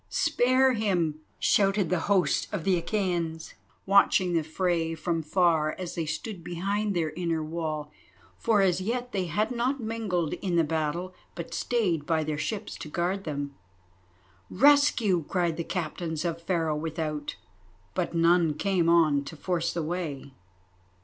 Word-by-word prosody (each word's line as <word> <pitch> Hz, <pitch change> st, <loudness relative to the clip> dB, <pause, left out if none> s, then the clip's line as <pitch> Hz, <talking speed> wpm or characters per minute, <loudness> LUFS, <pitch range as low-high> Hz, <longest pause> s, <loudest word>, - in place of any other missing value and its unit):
"Spare 255 Hz, +1 st, +3 dB
him!" 180 Hz, -9 st, 0 dB, 0.2 s
shouted 195 Hz, -3 st, +2 dB
the 180 Hz, -, +2 dB
host 195 Hz, -3 st, +2 dB
of 200 Hz, -6 st, -3 dB
the 185 Hz, -3 st, +2 dB
Achæans, 170 Hz, -5 st, -2 dB, 0.3 s
watching 195 Hz, -2 st, +4 dB
the 165 Hz, -2 st, +2 dB
fray 165 Hz, 0 st, -1 dB
from 165 Hz, +1 st, -1 dB
far, 160 Hz, -1 st, +2 dB
as 180 Hz, -2 st, -5 dB
they 165 Hz, -2 st, -3 dB
stood 170 Hz, +3 st, -5 dB
behind 200 Hz, +4 st, -2 dB
their 160 Hz, -3 st, 0 dB
inner 165 Hz, -1 st, -2 dB
wall, 155 Hz, -2 st, -4 dB, 0.5 s
for 220 Hz, -3 st, +3 dB
as 185 Hz, -1 st, +2 dB
yet 245 Hz, +5 st, -2 dB
they 190 Hz, -3 st, -1 dB
had 210 Hz, +8 st, 0 dB
not 250 Hz, +3 st, 0 dB
mingled 220 Hz, -8 st, -2 dB
in 180 Hz, -3 st, -2 dB
the 165 Hz, -, +4 dB
battle 160 Hz, +4 st, -2 dB, 0.2 s
but 170 Hz, -1 st, -6 dB
stayed 180 Hz, -11 st, 0 dB
by 160 Hz, -2 st, +1 dB
their 150 Hz, -1 st, -3 dB
ships 205 Hz, +8 st, -3 dB
to -, -, -7 dB
guard 180 Hz, +5 st, -1 dB
them. 145 Hz, -2 st, -4 dB, 1.0 s
"Rescue!" 245 Hz, -, +4 dB
cried 175 Hz, -3 st, 0 dB
the 170 Hz, -, -3 dB
Captains 165 Hz, -1 st, -3 dB
of 170 Hz, -1 st, -2 dB
Pharaoh 165 Hz, -3 st, 0 dB
without, 155 Hz, -1 st, -3 dB, 0.6 s
but -, -, -2 dB
none 165 Hz, -2 st, +4 dB
came 185 Hz, -3 st, +1 dB
on 155 Hz, -4 st, +4 dB
to 160 Hz, -, -8 dB
force 170 Hz, 0 st, -1 dB
the 170 Hz, -, -2 dB
way. 155 Hz, -5 st, -4 dB
170 Hz, 150 wpm, -27 LUFS, 160-195 Hz, 1.0 s, watching